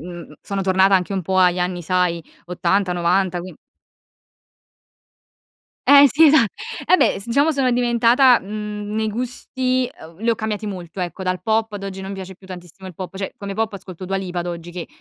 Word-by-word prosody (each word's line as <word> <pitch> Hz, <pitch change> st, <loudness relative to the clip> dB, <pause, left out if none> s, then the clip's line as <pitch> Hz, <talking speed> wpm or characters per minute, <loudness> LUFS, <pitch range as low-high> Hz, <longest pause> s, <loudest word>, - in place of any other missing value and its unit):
mhmm, 175 Hz, -1 st, -9 dB
sono 200 Hz, -1 st, -4 dB
tornata 190 Hz, +1 st, +3 dB
anche 180 Hz, +2 st, -2 dB
un 190 Hz, -1 st, -2 dB
po' 190 Hz, +3 st, -2 dB
agli 180 Hz, -1 st, +4 dB
anni, 180 Hz, -1 st, -2 dB
sai, 180 Hz, -1 st, 0 dB, 0.2 s
'80, 180 Hz, +1 st, 0 dB
'90, 175 Hz, +1 st, +1 dB
quin 180 Hz, +1 st, -8 dB, 2.3 s
Eh, 285 Hz, 0 st, +9 dB
sì, 305 Hz, +6 st, +5 dB
esa 295 Hz, -5 st, +6 dB, 0.4 s
vabbè, 370 Hz, -, +4 dB
s 195 Hz, -, -9 dB
diciamo 280 Hz, +7 st, +2 dB
sono 270 Hz, -4 st, +1 dB
diventata, 240 Hz, +1 st, +4 dB
mhmm, 210 Hz, +1 st, -6 dB
nei 220 Hz, 0 st, 0 dB
gusti 255 Hz, +2 st, -2 dB
ehm, 165 Hz, +1 st, -15 dB
li 230 Hz, +3 st, 0 dB
ho 230 Hz, -, +1 dB
cambiati 215 Hz, 0 st, -3 dB
molto 185 Hz, -2 st, -7 dB
ecco, 180 Hz, +1 st, -4 dB
dal 185 Hz, 0 st, -2 dB
pop 220 Hz, -1 st, 0 dB
ad 205 Hz, -1 st, -6 dB
oggi 195 Hz, -1 st, -6 dB
non 195 Hz, +1 st, -6 dB
piace 190 Hz, -1 st, -8 dB
più 190 Hz, -, -18 dB
tantissimo 185 Hz, 0 st, -11 dB
il 180 Hz, -, -11 dB
pop, 185 Hz, +2 st, -7 dB
cioè, 195 Hz, 0 st, -5 dB
come 200 Hz, -1 st, -6 dB
pop 220 Hz, 0 st, -1 dB
ascolto 185 Hz, -2 st, -9 dB
Dua 195 Hz, +1 st, -2 dB
Lipa 185 Hz, -2 st, -4 dB
ad 175 Hz, -, -5 dB
oggi, 175 Hz, 0 st, -6 dB
che 175 Hz, -1 st, -6 dB
195 Hz, 190 wpm, -21 LUFS, 180-225 Hz, 2.3 s, Eh